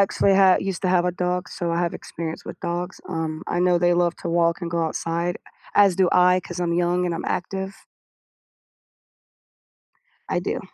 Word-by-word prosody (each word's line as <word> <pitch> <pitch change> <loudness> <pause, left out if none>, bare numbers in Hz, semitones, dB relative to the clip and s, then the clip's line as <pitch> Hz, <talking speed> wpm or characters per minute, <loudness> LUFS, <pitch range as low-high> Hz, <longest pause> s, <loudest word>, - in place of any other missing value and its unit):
actually 195 0 +3
ha 190 -1 +6
used 195 -3 -3
to 185 - +1
have 180 -1 +3
a - - +2
dog, 180 0 -2
so 170 -1 -3
I 170 - 0
have 175 -1 -1
experience 165 -1 -6
with - - -9
dogs, 175 +1 -4
um, 160 -2 -3
I - - -1
know 180 0 +3
they 175 0 +3
love 175 0 +2
to - - -6
walk 170 0 +2
and 170 -2 -4
go 170 0 0
outside, 165 +2 -2 0.4
as 200 -3 +5
do 185 -2 +3
I, 180 0 +5
'cause 175 0 -7
I'm 170 -1 0
young 175 +1 +1
and 175 - -1
I'm 165 - -5
active. 190 +1 -4 2.4
I - - 0
do. - - -3
175 Hz, 190 wpm, -23 LUFS, 170-180 Hz, 2.4 s, ha